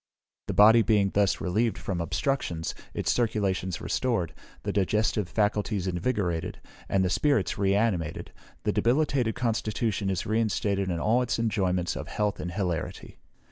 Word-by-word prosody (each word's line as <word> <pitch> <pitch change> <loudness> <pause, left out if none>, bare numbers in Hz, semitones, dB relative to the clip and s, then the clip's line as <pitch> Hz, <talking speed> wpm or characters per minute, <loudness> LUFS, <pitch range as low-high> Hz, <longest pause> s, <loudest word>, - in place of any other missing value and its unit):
The - - -2
body 110 +3 +7
being 105 -3 +2
thus 100 -2 +2
relieved 110 +5 0
from 90 -4 -3
obstructions, 85 - -1 0.2
its - - -1
circulations 95 -6 0
restored, 115 - -1 0.3
the - - -2
digestive 105 0 +1
faculties 105 -2 0
invigorated, 90 -3 -1 0.3
and 95 -1 +2
the - - +1
spirits 140 -10 +1
re 100 -1 +2
animated, 100 -8 -1 0.3
the - - +1
debilitated 125 -3 +1
constitution 110 -2 -1
is 95 - -1
reinstated 105 -3 0
in 85 -2 -1
all 115 +7 +2
its 125 -1 -1
enjoyments 95 -6 0
of - - -5
health 105 -1 -1
and 90 - -4
hilarity. 90 -5 -3
105 Hz, 140 wpm, -27 LUFS, 95-115 Hz, 0.3 s, body